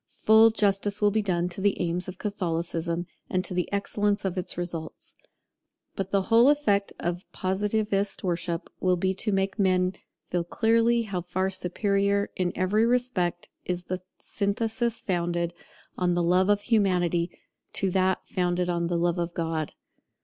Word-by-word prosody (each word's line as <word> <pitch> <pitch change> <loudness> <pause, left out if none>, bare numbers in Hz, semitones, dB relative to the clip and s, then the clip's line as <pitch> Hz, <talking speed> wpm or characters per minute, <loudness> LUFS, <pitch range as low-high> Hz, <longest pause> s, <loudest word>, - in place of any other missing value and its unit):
Full 220 +1 +6
justice 205 -1 +1
will 205 -1 +3
be 215 +1 +1
done 180 -3 0
to 180 +2 -7
the 205 0 +1
aims 175 +2 -1
of 185 0 -7
Catholicism, 170 -4 -2 0.2
and 185 0 0
to 185 - -6
the 180 -1 -1
excellence 205 0 0
of 190 -1 -1
its 185 -2 -1
results. 170 -2 -5 0.8
But 195 -1 -3
the 195 -1 +1
whole 230 +6 +5
effect 210 -10 +2
of 175 +2 -4
Positivist 205 +1 -1
worship 170 -1 -2
will 185 -1 +2
be 190 +2 +1
to 210 +3 -2
make 195 +2 0
men 185 -1 +2 0.4
feel 175 -1 +1
clearly 230 +5 +2
how 195 -5 -3
far 185 +2 -1
superior 200 +2 0
in 180 -1 0
every 205 +5 +2
respect 235 -9 0
is 180 0 -3
the 185 0 -4 0.2
synthesis 225 +3 -2
founded 175 -2 -1 0.5
on 180 -1 +2
the 175 - +1
Love 180 +3 +3
of 205 0 +3
Humanity 180 -6 +1 0.4
to 190 -1 0
that 185 0 +1
founded 180 -1 0
on 170 -1 0
the 170 0 0
Love 175 +1 +1
of 170 0 -3
God. 160 -2 -2
185 Hz, 160 wpm, -27 LUFS, 175-205 Hz, 0.8 s, Full